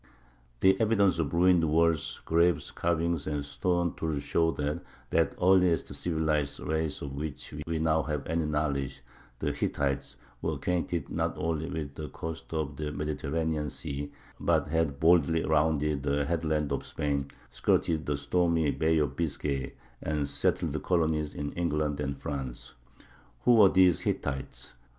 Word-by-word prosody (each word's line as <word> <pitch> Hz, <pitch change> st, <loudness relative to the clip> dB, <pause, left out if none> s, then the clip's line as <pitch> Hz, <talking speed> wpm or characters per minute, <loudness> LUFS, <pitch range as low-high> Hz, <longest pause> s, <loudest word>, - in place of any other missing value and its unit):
The 95 Hz, +2 st, +5 dB
evidences 100 Hz, -5 st, +3 dB
of 75 Hz, -4 st, 0 dB
ruined 90 Hz, 0 st, +4 dB
walls, 80 Hz, 0 st, +1 dB
graves, 85 Hz, -1 st, +2 dB
carvings, 85 Hz, -2 st, 0 dB
and 75 Hz, -2 st, -2 dB
stone 85 Hz, +3 st, 0 dB
tools 75 Hz, -3 st, -2 dB
show 80 Hz, +3 st, +2 dB
that 75 Hz, +1 st, -2 dB, 0.3 s
that 80 Hz, -3 st, +2 dB
earliest 90 Hz, -3 st, +4 dB
of -, -, -5 dB
civilized 80 Hz, -4 st, 0 dB
races 80 Hz, -1 st, -2 dB
of 70 Hz, -1 st, -5 dB
which 75 Hz, +1 st, -6 dB
we 80 Hz, -1 st, -1 dB
now 80 Hz, 0 st, +2 dB
have 75 Hz, -2 st, -3 dB
any 80 Hz, -1 st, 0 dB
knowledge—the 70 Hz, -3 st, -3 dB
Hittites—were 70 Hz, -3 st, -3 dB
acquainted 85 Hz, -4 st, -2 dB
not -, -, -1 dB
only 80 Hz, 0 st, -1 dB
with 75 Hz, -5 st, -4 dB
the 75 Hz, -1 st, -6 dB
coasts 80 Hz, +2 st, -7 dB
of 75 Hz, -3 st, -2 dB
the 75 Hz, -1 st, -3 dB
Mediterranean 75 Hz, +1 st, -2 dB
Sea, 70 Hz, +2 st, -5 dB, 0.3 s
but -, -, +1 dB
had 80 Hz, -3 st, 0 dB
boldly 80 Hz, 0 st, +4 dB
rounded 75 Hz, -2 st, +2 dB
the 70 Hz, +1 st, 0 dB
headlands 80 Hz, -3 st, 0 dB
of -, -, -2 dB
Spain, 70 Hz, -2 st, -2 dB, 0.2 s
skirted 80 Hz, -2 st, +1 dB
the 75 Hz, -1 st, 0 dB
stormy 80 Hz, +1 st, +2 dB
Bay 80 Hz, 0 st, +2 dB
of 75 Hz, -3 st, 0 dB
Biscay, 70 Hz, -4 st, -2 dB, 0.3 s
and 75 Hz, -2 st, -1 dB
settled -, -, 0 dB
colonies 80 Hz, -4 st, 0 dB
in 70 Hz, 0 st, -3 dB
England 75 Hz, -4 st, -1 dB
and 70 Hz, -1 st, -2 dB
France. 65 Hz, -3 st, -5 dB, 0.7 s
Who 120 Hz, -, +5 dB
were 105 Hz, -4 st, +8 dB
these 90 Hz, -2 st, +5 dB
Hittites? 70 Hz, -2 st, -3 dB
75 Hz, 145 wpm, -29 LUFS, 70-85 Hz, 0.7 s, were